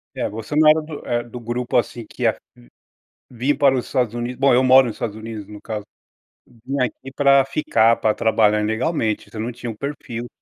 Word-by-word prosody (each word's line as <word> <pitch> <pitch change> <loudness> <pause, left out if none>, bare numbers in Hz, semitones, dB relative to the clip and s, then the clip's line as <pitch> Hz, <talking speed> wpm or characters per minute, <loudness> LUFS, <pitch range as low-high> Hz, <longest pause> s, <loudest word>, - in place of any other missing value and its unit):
É, - - -2
você 115 +7 -6
não 155 0 +6
era 155 +1 +5
do 155 -1 -9
eh, 120 0 0
do 120 +1 -9
grupo, 120 +1 -3
assim, 120 -1 -1
que - - -7
ia - - +3 0.9
vir 130 +4 -1
para 140 -2 +4
os 125 - -3
Estados 125 -5 -1
Unidos 120 +1 -4
bom, 135 -1 +4
eu 125 +2 +4
moro 130 0 +6
nos 110 - -5
Estados 105 -2 -4
Unidos 110 -1 -7
no 105 0 -11
caso, 105 -2 -5 0.6
vir 125 +4 -6
aqui 130 +1 -3
para 140 -1 +5
ficar, 115 -5 +2
para 110 -1 +1
trabalhar 105 -1 +2
ilegalmente, 110 +1 -1
você 110 - -8
não 115 +3 -3
tinha 120 0 -6
o 110 - -11
perfil 120 -3 -5
120 Hz, 205 wpm, -21 LUFS, 110-135 Hz, 0.9 s, não